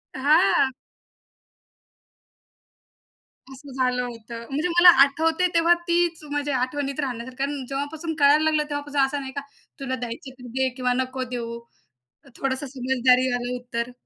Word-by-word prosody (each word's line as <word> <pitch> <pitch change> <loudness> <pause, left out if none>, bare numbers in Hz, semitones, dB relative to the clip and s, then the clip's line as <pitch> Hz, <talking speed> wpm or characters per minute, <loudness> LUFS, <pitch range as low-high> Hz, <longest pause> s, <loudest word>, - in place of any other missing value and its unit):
हां. 285 0 +3 2.8
असं 275 +1 -12
झालं 250 -1 0
होतं. 235 -1 -8
म्हणजे 300 +6 -1
मला 345 +1 +7
आठवतयं, 320 +5 +1
तेव्हा 335 +1 +5
तीच 340 -2 +1
माझ्या 290 -2 -1
आठवणीत 275 +2 -3
राहण्यासारखं 255 0 -4
अन् 280 -2 -3
जेव्हापासून 300 +4 -4
कळायला 290 +2 +5
लागलं 310 -1 +2
तेव्हापासून 290 -1 -2
असं 275 +2 +1
नाही 265 0 -7
का 280 - -2 0.4
"तुला 260 -1 -3
द्यायचं 245 +2 -7
तर 250 - -9
दे 260 0 +2
किंवा 250 -1 0
नको 260 0 -2
देऊ" 235 0 -5 0.8
थोडंसं 270 +1 -2
समजदारीवालं 250 -1 +1
उत्तर. 245 0 -4
270 Hz, 130 wpm, -24 LUFS, 250-290 Hz, 2.8 s, मला